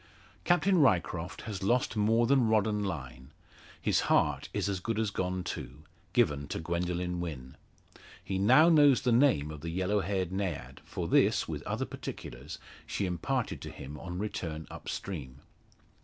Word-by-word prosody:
Captain 180 +1 +4
Ryecroft 90 - +1
has 105 -4 -5
lost 120 +4 +1
more 110 +2 +3
than 130 -1 +4
rod 110 -2 +3
and 105 -1 -1
line; 65 -8 -5 0.5
his - - +2
heart - - +2
is - - -1
as 100 -2 -1
good 110 +4 -2
as 110 -2 0
gone 90 -1 -2
too 75 -2 -6 0.3
given 75 -12 +2
to - - -4
Gwendoline 90 +1 -2
Wynn. 70 -7 -6 0.7
He 95 -1 -2
now 130 +11 +6
knows 145 -5 +6
the 125 - +2
name 115 - +3
of 75 -2 -8
the 85 - -4
yellow 95 +4 0
haired 95 -1 -1
Naiad 80 -10 -4
for - - -4
this, - - +3
with - - -4
other - - -1
particulars, - - -7 0.3
she 100 - -1
imparted 115 +8 -2
to - - -6
him 75 +2 -9
on 90 -1 -6
return 85 -6 -4
up - - -8
stream. 70 -8 -6
95 Hz, 165 wpm, -30 LUFS, 80-110 Hz, 0.7 s, now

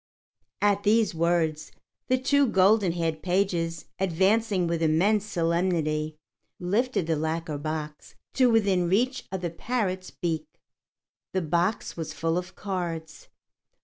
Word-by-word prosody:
At 205 -1 +3
these 215 -1 +3
words, 160 -2 0 0.4
the 255 - +3
two 280 +2 +3
golden 195 -2 +4
haired 165 -2 -2
pages, 175 -3 0
advancing 190 +2 +2
with 170 -1 -1
immense 185 +7 +3
solemnity, 165 -4 0 0.4
lifted 205 +2 0
the 160 0 +1
lacquer 160 -1 -2
box 155 0 -5 0.2
to 255 -2 +4
within 195 -6 +2
reach 250 +7 +1
of 190 -1 -3
the 175 -2 -2
parrot's 185 -1 -2
beak. 160 -3 -3 0.9
The 190 -1 0
box 170 +7 0
was 160 -2 -4
full 165 +1 0
of 180 +1 -9
cards. 170 -5 -5
175 Hz, 125 wpm, -26 LUFS, 160-200 Hz, 0.9 s, golden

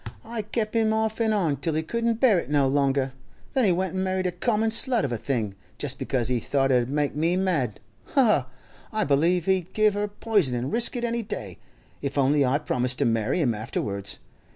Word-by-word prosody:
I 230 0 -4
kep' 215 +1 -3
him 220 -1 +3
off 220 +1 -1
an' 220 -1 +2
on 170 -9 +1
till 155 +3 -2
he 160 - 0
couldn't 230 +5 -1
bear 230 -8 +5
it - - -7
no 145 -2 +3
longer; 135 -1 +1 0.4
then 260 -4 +3
he 190 - +4
went 185 +1 -1
an' 190 0 -1
married 185 0 -1
a 180 - +1
common 220 +4 0
slut 235 0 +2
of 135 - -3
a - - 0
thing, 110 -6 -2 0.2
just 135 -2 -2
because 125 -4 -1
he 125 -1 +1
thought 135 +3 +1
it 125 -1 +4
'ud 120 - -4
make 145 0 -1
me 165 +4 +1
mad. 165 - 0 0.4
Ha, 275 - +6
ha! 180 - +3 0.4
I 215 0 0
believe 165 +3 +2
he'd 190 -2 0
give 215 -1 +4
her 205 +1 -1
poison 205 - 0
an' 120 +2 -2
risk 235 +2 +1
it 240 - -2
any 235 0 0
day, 105 - -6 0.4
if 140 0 -4
only 140 +1 +3
I 130 +2 +2
promised 125 -4 -1
to - - +1
marry 115 +8 +1
him 125 -6 +2
afterwards. 100 -2 -3
165 Hz, 225 wpm, -25 LUFS, 135-215 Hz, 0.4 s, Ha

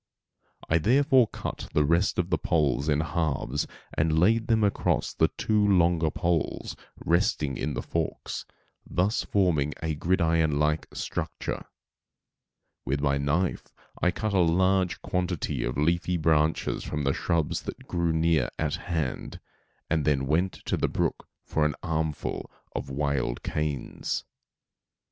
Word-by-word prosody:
I 80 - +3
therefore 130 - +4
cut - - -6
the 75 - +3
rest 85 +5 +2
of 90 0 0
the - - +2
poles 75 -3 +1
in 75 0 +3
halves 75 -4 -1 0.3
and 80 +1 +2
laid 110 +7 +3
them 110 -2 +3
across 100 - +1
the - - +3
two 105 -1 0
longer 85 -5 +3
poles 85 -1 -1 0.3
resting 85 - +1
in - - -2
the - - -3
forks, - - -3 0.4
thus 95 +5 0
forming 80 -7 +1
a 80 -1 0
gridiron 80 -2 +2
like 75 +1 +1
structure. - - -4 1.2
With 70 +3 -1
my 70 -1 +1
knife 80 +6 0 0.3
I 90 - +4
cut 105 +3 -2
a 95 - +3
large 95 +2 +2
quantity 90 -3 -1
of - - -2
leafy 85 +4 +1
branches 80 -1 +1
from 75 -1 -3
the 70 0 +2
shrubs 80 -3 0
that - - -8
grew 85 -1 0
near 80 -4 +2
at - - -1
hand, 80 -7 -3 0.5
and 80 -2 +1
then 70 -2 +2
went 85 +6 +1
to - - 0
the - - +1
brook - - -1 0.2
for 80 - 0
an 75 -3 +1
armful 80 -2 -2 0.3
of - - -3
wild 70 -3 -1
canes. 75 -3 -2
80 Hz, 140 wpm, -27 LUFS, 75-90 Hz, 1.2 s, therefore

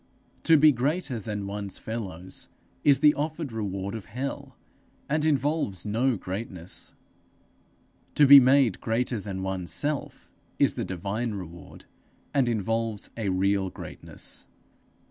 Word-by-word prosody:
To 165 -1 +7
be 155 +1 +7
made 140 - +1
greater 140 -1 -1
than 105 -1 -4
one's 100 0 -4
fellows 95 -5 -6 0.3
is 140 -2 +5
the 150 -1 +7
offered 155 -1 -3
reward 100 -3 -3
of 110 -4 -6
hell, 135 +2 -5 0.5
and 150 +1 0
involves 145 - 0
no 115 +3 +1
greatness; 95 -2 -6 1.2
to 150 - +6
be 140 0 +11
made 130 -5 +4
greater 120 +1 0
than 95 -2 -5
one's 95 -4 -3
self, 145 - -1 0.3
is - - +3
the - - -3
divine 100 +5 -3
reward, 85 -3 -10 0.5
and 135 -4 +3
involves 115 -1 -1
a 110 -4 -2
real 95 +1 +1
greatness. - - -8
115 Hz, 130 wpm, -27 LUFS, 95-140 Hz, 1.2 s, be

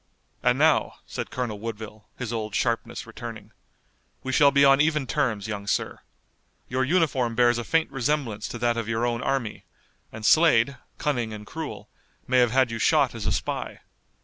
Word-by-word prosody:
"And - - +2
now," - - +3
said - - -5
Colonel 120 -5 -4
Woodville, 110 -1 -7
his 120 -2 -4
old 110 -2 -3
sharpness 115 0 -1
returning, 115 -2 -9 0.7
"we 130 - -3
shall 140 +1 +6
be 140 0 +4
on 135 0 +6
even 150 -2 +1
terms, 120 -9 -1
young 100 -2 -5
sir. - - -1 0.7
Your 130 +1 0
uniform 130 -6 +1
bears 120 0 +4
a - - -3
faint 160 +3 +1
resemblance 125 -5 -1
to - - -6
that 120 0 0
of 115 -1 -3
your 115 +1 0
own 120 -1 -1
army, 130 -6 -2 0.5
and 110 0 -7
Slade, 140 -5 +5 0.2
cunning 120 -7 -1
and 105 0 -8
cruel, 160 +7 -7 0.4
may 130 0 +3
have 120 -1 +4
had 130 0 +2
you 115 - -4
shot 145 +1 +3
as 115 -2 -4
a - - +1
spy. - - -3
120 Hz, 175 wpm, -25 LUFS, 110-135 Hz, 0.7 s, shall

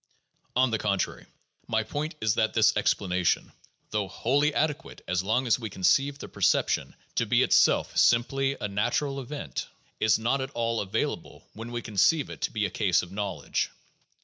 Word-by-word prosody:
On 130 -1 +3
the 110 - 0
contrary, 100 -3 -2 0.4
my - - +1
point 155 +2 -4
is 110 -2 +2
that 110 0 0
this 110 -1 +4
explanation, 90 -3 +1 0.4
though 105 -2 -1
wholly 140 +9 +1
ade 150 0 +1
quate - - -13
as 90 +1 0
long 110 +7 0
as 120 +1 +2
we 115 -3 -5
conceive 135 +10 +2
the - - -8
perception - - +1 0.2
to - - 0
be - - +4
itself - - +3
simply 135 +3 +2
a - - -2
natural 135 +8 -1
event, 140 +3 -5 0.3
is 110 - +4
not 120 +5 0
at 130 - -3
all 115 -1 0
available 105 +2 -3
when 115 +2 -8
we 120 -1 -4
conceive 110 - +2
it - - -10
to - - -1
be 105 -2 0
a 100 - -3
case 95 -3 +2
of 90 - -10
knowledge. 100 0 -2
115 Hz, 175 wpm, -27 LUFS, 100-135 Hz, 0.4 s, this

